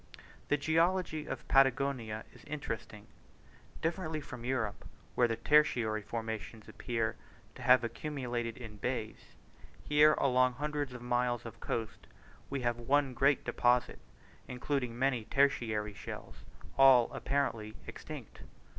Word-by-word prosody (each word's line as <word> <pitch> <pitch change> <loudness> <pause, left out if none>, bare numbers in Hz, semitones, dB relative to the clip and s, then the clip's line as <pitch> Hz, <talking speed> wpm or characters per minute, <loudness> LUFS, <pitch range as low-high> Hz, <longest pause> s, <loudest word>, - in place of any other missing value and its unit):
The 145 - +2
geology 160 +1 +1
of - - -6
Patagonia 135 -5 +2
is - - -16
interesting. 115 -7 -6 0.8
Differently 165 -1 -1
from 125 -5 -9
Europe, 120 -5 -2 0.3
where 120 - +3
the 115 - -1
tertiary 115 -6 +3
formations 110 0 -6
appear 115 -2 -2 0.4
to - - -12
have 125 0 +6
accumulated 120 -2 -3
in 110 -4 -9
bays, 115 0 -4 0.5
here 150 +4 +5
along 130 -1 +3
hundreds 145 0 -3
of 125 -1 -8
miles 120 -1 0
of 115 - -9
coast 115 -2 -4 0.4
we 140 -1 -3
have 120 -1 0
one 135 +2 +2
great 135 +2 +2
deposit, 125 0 +2 0.5
including 125 -1 -2
many 125 -3 +1
tertiary 115 -5 +1
shells, 100 - -8 0.4
all 130 -3 +7
apparently 115 -6 -1
extinct. - - -9
125 Hz, 120 wpm, -32 LUFS, 115-140 Hz, 0.8 s, all